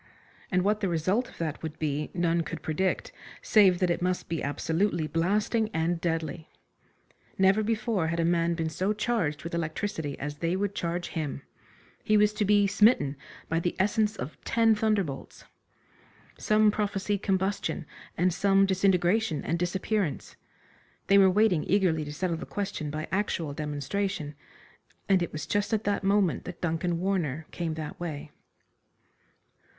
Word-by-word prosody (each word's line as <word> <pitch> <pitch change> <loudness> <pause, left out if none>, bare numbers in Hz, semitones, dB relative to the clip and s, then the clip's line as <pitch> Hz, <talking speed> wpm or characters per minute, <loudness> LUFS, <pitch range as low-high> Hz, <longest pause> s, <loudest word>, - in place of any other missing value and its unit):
And 180 -1 +2
what 210 +2 +2
the 195 -3 0
result 185 +9 0
of - - -16
that 160 -3 -3
would 160 -1 -6
be 150 -1 -2
none 170 -1 +2
could - - -6
predict, 185 +4 -1 0.3
save 195 -4 +5
that 180 -1 +1
it 170 - -1
must 180 0 -1
be 165 -1 -2
absolutely 165 +4 0
blasting 210 +7 +1
and 165 +1 0
deadly. 165 -1 -2 0.9
Never 195 +2 +4
before 215 -4 0
had 170 +1 -1
a 165 - +2
man 170 0 +2
been 165 -1 -1
so 190 +6 0
charged 215 -9 -1
with 170 - -6
electricity 160 -1 -3
as 145 +1 -5
they 170 +2 0
would 200 +1 -1
charge 175 -1 -3
him. 150 -4 -4 0.6
He 215 - +3
was 210 0 +4
to 210 0 0
be 205 0 +4
smitten 200 - +3 0.3
by 165 - 0
the 175 +1 -2
essence 210 +2 +1
of 140 -1 -7
ten 225 -1 +3
thunderbolts. 210 -10 -2 0.9
Some 215 0 +3
prophesied 205 -1 -1
combustion, 190 -3 -1 0.3
and 180 +1 +2
some 195 +1 +4
disintegration 190 -1 +2
and 170 +1 -1
disappearance. 190 0 -2 0.7
They 200 0 +5
were 190 -1 +7
waiting 190 -4 +3
eagerly 180 -4 +2
to 145 - -6
settle 170 +2 -2
the 165 - -7
question 195 -7 -3
by 155 +1 -4
actual 170 -6 -1
demonstration, 150 +3 -3 0.7
and 190 -2 +4
it 175 - -2
was 155 - -5
just 205 +2 -1
at 215 - -3
that 205 -1 0
moment 195 -3 +2
that 180 -1 -7
Duncan 170 0 -1
Warner 165 -6 -1
came 165 -2 -3
that 155 -1 -6
way. 160 -5 -5
180 Hz, 155 wpm, -28 LUFS, 160-205 Hz, 0.9 s, were